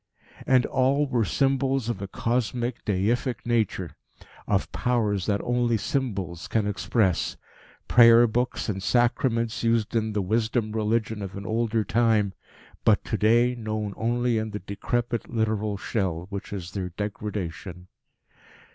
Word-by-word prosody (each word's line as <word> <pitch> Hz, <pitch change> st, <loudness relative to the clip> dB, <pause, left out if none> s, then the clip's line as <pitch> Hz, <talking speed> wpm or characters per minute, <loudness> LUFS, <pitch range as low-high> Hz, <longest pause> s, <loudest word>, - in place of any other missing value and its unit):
And 130 Hz, -1 st, +4 dB
all 135 Hz, +3 st, +2 dB
were 125 Hz, -4 st, +1 dB
symbols 135 Hz, +2 st, +1 dB
of 115 Hz, -5 st, -3 dB
a 100 Hz, -, -4 dB
cosmic, 120 Hz, +3 st, -2 dB
deific 110 Hz, +5 st, 0 dB
nature; 110 Hz, -7 st, -1 dB, 0.5 s
of -, -, 0 dB
Powers 105 Hz, -7 st, 0 dB
that 100 Hz, -1 st, +1 dB
only 120 Hz, -1 st, +1 dB
symbols 100 Hz, -, -3 dB
can 110 Hz, -2 st, 0 dB
express 100 Hz, -1 st, 0 dB, 0.5 s
prayer 115 Hz, 0 st, +7 dB
books 120 Hz, +2 st, -1 dB
and 95 Hz, -3 st, -2 dB
sacraments 115 Hz, +2 st, +1 dB
used 115 Hz, -1 st, +1 dB
in 110 Hz, -1 st, 0 dB
the 105 Hz, -, 0 dB
Wisdom 110 Hz, +2 st, 0 dB
Religion 110 Hz, 0 st, -1 dB
of 95 Hz, -1 st, -6 dB
an 100 Hz, -, -7 dB
older 115 Hz, 0 st, 0 dB
time, 110 Hz, -3 st, +2 dB, 0.5 s
but -, -, +3 dB
to -, -, -2 dB
day 120 Hz, +3 st, +4 dB
known 110 Hz, -3 st, -3 dB
only 120 Hz, 0 st, 0 dB
in 110 Hz, 0 st, -3 dB
the 105 Hz, 0 st, -5 dB
decrepit, 120 Hz, +3 st, -2 dB
literal 110 Hz, -2 st, -1 dB
shell 95 Hz, -5 st, -2 dB
which 100 Hz, +1 st, -6 dB
is 90 Hz, -4 st, -5 dB
their 95 Hz, -2 st, -3 dB
degradation. 95 Hz, -2 st, -5 dB
110 Hz, 140 wpm, -26 LUFS, 100-120 Hz, 0.5 s, prayer